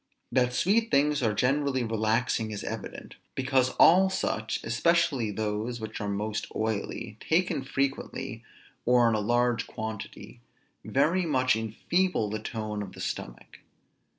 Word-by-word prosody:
That 125 0 +2
sweet 215 - +2
things 145 -1 +3
are 115 -3 +2
generally 135 +2 +1
relaxing, 110 +1 0
is 105 -2 -5
evident; - - -7 0.2
because 130 -1 +2
all 190 +3 +6
such, 110 - -2
especially 135 0 +2
those 110 +3 -2
which 110 -1 -6
are 105 - -2
most 105 +2 -2
oily, 110 0 -3
taken 165 -4 +1
frequently, 135 +1 -3 0.4
or 125 -1 +4
in 115 - +3
a 110 - +1
large 120 +2 +1
quantity, 110 - -7 0.4
very 165 +6 +2
much 130 -5 +3
enfeeble 110 - 0
the 110 - -2
tone 110 -1 -4
of 100 -2 -7
the - - -12
stomach. - - -6
120 Hz, 135 wpm, -28 LUFS, 110-140 Hz, 0.4 s, all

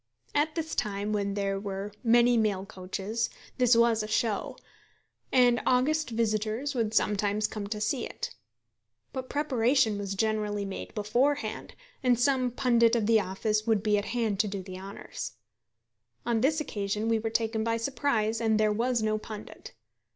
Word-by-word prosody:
At 300 +1 +1
this 320 -1 -3
time, 205 -1 -1
when 200 -1 -1
there 195 -1 -1
were 200 0 -5
many 240 +1 +5
mail 205 -4 +1
coaches, 200 +3 -3 0.3
this 250 -1 +5
was 230 -1 +4
a 215 - -4
show, 215 -1 -1 0.7
and 245 -2 +4
august 295 +5 +2
visitors 225 +4 -1
would 230 -4 0
sometimes 210 0 +1
come 210 -1 -4
to 210 +1 -4
see 225 +5 -1
it. 485 0 -6 0.8
But 260 -1 -5
preparation 255 -6 +2
was 200 -1 -3
generally 210 -1 0
made 195 - -7
beforehand, 245 +8 0 0.3
and 245 -2 +3
some 255 -1 +2
pundit 235 -2 +3
of 225 -3 +1
the 225 0 +5
office 210 +3 -1
would 220 -3 +2
be 210 -1 +3
at 205 - -5
hand 225 -5 -1
to 215 - +3
do 195 -1 -4
the 185 0 -8
honours. 195 - -7 0.9
On 235 -2 +1
this 305 +5 +2
occasion 210 -5 -2
we 225 -1 +2
were 225 +1 -2
taken 220 0 0
by 230 0 0
surprise, 230 -3 0
and 220 -1 +2
there 215 -1 +3
was 235 +1 0
no 215 0 +1
pundit. 215 - -9
220 Hz, 165 wpm, -28 LUFS, 210-245 Hz, 0.9 s, many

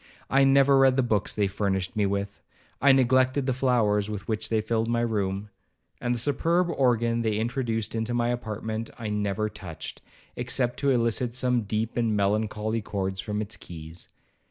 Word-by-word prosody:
I 135 +1 +5
never 135 0 +5
read 135 -1 +5
the 135 - +3
books 110 -4 0
they 105 - +2
furnished 95 +1 -1
me 105 -2 +2
with,—I 100 +7 -1
neglected 130 +1 +3
the 130 - +1
flowers 115 -5 +2
with 105 -2 -6
which 110 -1 -2
they 110 - +2
filled 110 +1 0
my 120 0 +1
room,—and 105 +2 -4
the - - -3
superb 165 +8 +1
organ 120 -4 +2
they 110 -2 0
introduced 115 -1 -2
into 115 +1 -2
my 120 0 +1
apartment, 110 -1 -3
I 115 -3 -4
never 105 0 -1
touched, 85 -5 -8 0.3
except 125 0 -1
to 140 - +1
elicit 120 -1 +1
some 125 -3 +1
deep 110 +3 -2
and 115 -3 +1
melancholy 105 +2 0
chords 95 -2 -3
from 105 0 -2
its 110 +2 -5
keys. 80 0 -10
110 Hz, 165 wpm, -26 LUFS, 105-125 Hz, 0.3 s, I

